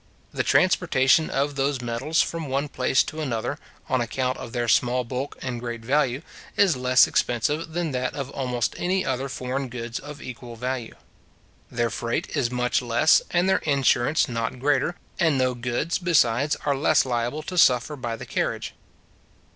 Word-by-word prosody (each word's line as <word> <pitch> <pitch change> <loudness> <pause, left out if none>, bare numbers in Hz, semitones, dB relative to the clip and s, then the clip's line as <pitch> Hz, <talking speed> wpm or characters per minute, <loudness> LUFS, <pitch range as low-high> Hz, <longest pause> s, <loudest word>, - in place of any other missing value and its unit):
The - - 0
transportation 130 +5 +3
of 140 +1 0
those 140 0 0
metals 125 +7 0
from 165 -2 -5
one 140 +2 -1
place 130 -1 +2
to 155 - -6
another, 120 -7 -2 0.3
on 130 - +1
account 125 +2 -1
of 115 - -7
their 120 -1 -2
small 125 +1 +2
bulk 130 +4 -5
and 125 -2 -3
great 120 -1 -5
value, 135 +2 +1 0.3
is 195 -6 +4
less 125 0 +5
expensive 150 +7 -1
than 170 -2 -1
that 130 -1 -2
of 140 -2 -5
almost 125 -3 -1
any 185 +1 0
other 130 +1 -2
foreign 130 +1 -3
goods 120 -1 -5
of 145 +1 -9
equal 120 -2 -8
value. 125 0 -4 0.7
Their 120 -1 -1
freight 115 +2 -3
is 120 - +1
much 125 0 0
less, 120 +5 +4
and 175 +1 +2
their 190 - +3
insurance 140 -1 +2
not 115 +1 -3
greater; 145 +5 +1 0.2
and 160 -5 +3
no 130 -1 +2
goods, 120 +7 -2
besides, 145 -6 +2
are 140 -1 +2
less 140 +1 +3
liable 120 +4 -2
to 180 - -6
suffer 130 -3 +4
by 120 -4 -4
the - - -9
carriage. - - -2
130 Hz, 170 wpm, -24 LUFS, 120-145 Hz, 0.7 s, less